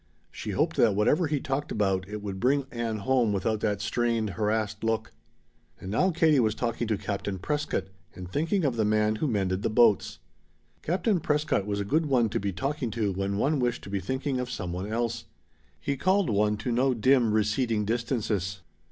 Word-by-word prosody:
She -, -, -7 dB
hoped -, -, 0 dB
that 110 Hz, -4 st, +4 dB
whatever 150 Hz, -, +3 dB
he 145 Hz, -1 st, 0 dB
talked 135 Hz, +2 st, -3 dB
about 95 Hz, -3 st, 0 dB
it 105 Hz, 0 st, -6 dB
would 95 Hz, -2 st, -5 dB
bring 135 Hz, +5 st, +2 dB
Ann 115 Hz, -2 st, -2 dB
home 120 Hz, 0 st, +2 dB
without 105 Hz, +2 st, 0 dB
that 105 Hz, -2 st, -1 dB
strained, 115 Hz, -1 st, 0 dB
harassed 105 Hz, +2 st, -1 dB
look. 115 Hz, 0 st, -1 dB, 0.7 s
And 95 Hz, -, -7 dB
now 180 Hz, -, +3 dB
Katie 160 Hz, -4 st, +3 dB
was 110 Hz, -3 st, +2 dB
talking 120 Hz, -1 st, -2 dB
to 110 Hz, -2 st, 0 dB
Captain 100 Hz, -1 st, -3 dB
Prescott 150 Hz, -1 st, -2 dB, 0.3 s
and 90 Hz, -1 st, -7 dB
thinking 165 Hz, -, 0 dB
of 125 Hz, -4 st, 0 dB
the 110 Hz, -, +2 dB
man 105 Hz, 0 st, +2 dB
who 155 Hz, -, 0 dB
mended 95 Hz, -5 st, 0 dB
the -, -, 0 dB
boats. 110 Hz, -2 st, +3 dB, 0.6 s
Captain 180 Hz, +4 st, +1 dB
Prescott 150 Hz, -, 0 dB
was 100 Hz, -1 st, -1 dB
a 100 Hz, -, -2 dB
good 155 Hz, +9 st, +1 dB
one 125 Hz, -5 st, +3 dB
to -, -, -1 dB
be 100 Hz, 0 st, -2 dB
talking 135 Hz, -, -2 dB
to 110 Hz, -3 st, -1 dB
when 100 Hz, +1 st, -2 dB
one 145 Hz, +6 st, +1 dB
wished 120 Hz, -1 st, -1 dB
to 100 Hz, -, -9 dB
be 100 Hz, -, 0 dB
thinking 130 Hz, -, -2 dB
of 125 Hz, 0 st, -3 dB
some 90 Hz, -8 st, -4 dB
one 95 Hz, +4 st, -4 dB
else. 115 Hz, 0 st, -2 dB, 0.5 s
He 140 Hz, -, -2 dB
called 185 Hz, -, +2 dB
one 105 Hz, +1 st, +2 dB
to 125 Hz, -, -3 dB
no 130 Hz, +2 st, +2 dB
dim, 120 Hz, 0 st, +3 dB
receding 110 Hz, +1 st, +1 dB
distances. 105 Hz, -5 st, -1 dB
110 Hz, 195 wpm, -27 LUFS, 105-130 Hz, 0.7 s, that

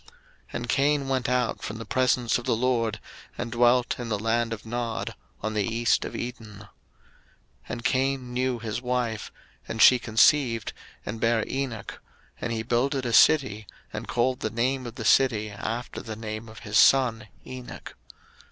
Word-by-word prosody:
01:004:016 -, -, -20 dB, 0.4 s
And -, -, -4 dB
Cain 140 Hz, 0 st, +2 dB
went 130 Hz, -2 st, 0 dB
out 125 Hz, -2 st, 0 dB
from 105 Hz, -, -5 dB
the 115 Hz, -, -7 dB
presence 125 Hz, 0 st, +2 dB
of 120 Hz, -, -9 dB
the 125 Hz, -, +2 dB
LORD, 115 Hz, -3 st, 0 dB, 0.4 s
and 120 Hz, -1 st, -4 dB
dwelt 120 Hz, +1 st, +3 dB
in 120 Hz, -1 st, -5 dB
the 105 Hz, -, 0 dB
land 115 Hz, +2 st, 0 dB
of 115 Hz, -1 st, -6 dB
Nod, 120 Hz, 0 st, -3 dB, 0.3 s
on 110 Hz, 0 st, -2 dB
the 105 Hz, -, +1 dB
east 115 Hz, +2 st, +1 dB
of -, -, -6 dB
Eden. 115 Hz, -3 st, -6 dB
01:004:017 105 Hz, -, -13 dB, 1.0 s
And 120 Hz, 0 st, -5 dB
Cain 130 Hz, -1 st, 0 dB
knew 125 Hz, 0 st, 0 dB
his 115 Hz, 0 st, -4 dB
wife; 125 Hz, -3 st, -2 dB, 0.4 s
and 115 Hz, -, -5 dB
she 125 Hz, +2 st, +8 dB
conceived, 115 Hz, 0 st, +3 dB, 0.3 s
and 110 Hz, +2 st, -5 dB
bare 115 Hz, -1 st, +2 dB
Enoch: 130 Hz, -6 st, -4 dB, 0.4 s
and 120 Hz, -, -2 dB
he 110 Hz, -1 st, -2 dB
builded 130 Hz, +3 st, 0 dB
a 120 Hz, -, -1 dB
city, 110 Hz, -7 st, +4 dB, 0.3 s
and -, -, -5 dB
called 125 Hz, +1 st, 0 dB
the 110 Hz, -, -2 dB
name 125 Hz, +3 st, -1 dB
of 115 Hz, -, -8 dB
the 115 Hz, -4 st, -6 dB
city, 110 Hz, -4 st, +3 dB
after 115 Hz, +4 st, -5 dB
the 110 Hz, -2 st, -6 dB
name 110 Hz, 0 st, -6 dB
of 110 Hz, 0 st, -12 dB
his 105 Hz, 0 st, +1 dB
son, 120 Hz, -5 st, +4 dB, 0.2 s
Enoch. 130 Hz, -1 st, -9 dB
120 Hz, 175 wpm, -26 LUFS, 110-125 Hz, 1.0 s, she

